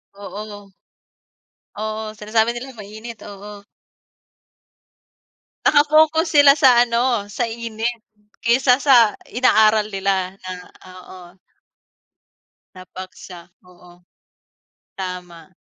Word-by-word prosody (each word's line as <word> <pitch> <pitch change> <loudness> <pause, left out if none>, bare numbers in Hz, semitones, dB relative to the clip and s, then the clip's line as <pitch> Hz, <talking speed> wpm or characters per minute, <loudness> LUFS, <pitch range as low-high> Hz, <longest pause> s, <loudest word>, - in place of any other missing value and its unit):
Oo. 205 0 -10 1.1
Oo. 215 +1 -4
Sinasabi 220 +2 0
nila 260 +2 -8
mainit. 215 +3 -10
Oo. 205 0 -11 2.0
Nakafocus 310 +3 +4
sila 285 -2 +7
sa 280 -3 +5 0.2
ano, 235 -2 0
sa 240 +3 -2
init 230 +1 -4 0.5
kaysa 250 +2 +3
sa 245 -6 +4
inaaral 215 -3 +3
nila 195 -2 -2
na 185 - -5 0.4
oo. 185 0 -13 1.5
Na 185 - -11
paksa, 185 -2 -11 0.2
oo. 180 -1 -19 0.9
Tama. 180 -2 -8
215 Hz, 85 wpm, -20 LUFS, 190-240 Hz, 2.0 s, sila